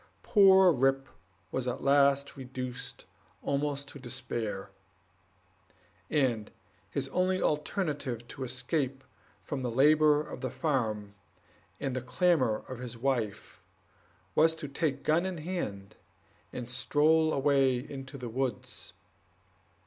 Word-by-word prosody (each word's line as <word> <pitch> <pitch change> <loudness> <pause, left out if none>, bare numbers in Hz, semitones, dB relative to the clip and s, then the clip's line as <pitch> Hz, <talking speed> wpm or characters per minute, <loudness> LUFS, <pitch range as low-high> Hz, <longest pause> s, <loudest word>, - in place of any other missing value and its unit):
Poor 190 -3 +7
Rip 135 -1 +2 0.4
was 130 -1 -2
at 125 - -3
last 140 0 +3
reduced 130 -1 -6 0.4
almost 140 0 -1
to 145 - -10
despair; 120 -6 -4 1.4
and 125 -8 +1 0.4
his - - -2
only 185 +1 +1
alternative, 150 - -1
to 135 - -6
escape 130 +2 -2 0.4
from 140 -2 -4
the 125 - -1
labor 150 +4 +5
of - - -8
the - - -2
farm 110 - -1 0.7
and 130 -3 -2
clamor 130 - +2
of 130 -2 -7
his 125 -2 -7
wife, 120 -5 -2 0.7
was 160 +1 +4
to 160 -2 -6
take 140 0 -2
gun 160 +3 +3
in 190 -2 -3
hand 150 - -5 0.5
and 125 -2 -6
stroll 150 +6 +3
away 135 -2 +3
into 135 +1 -7
the 125 -2 -6
woods. 130 +2 -4
135 Hz, 115 wpm, -30 LUFS, 125-150 Hz, 1.4 s, Poor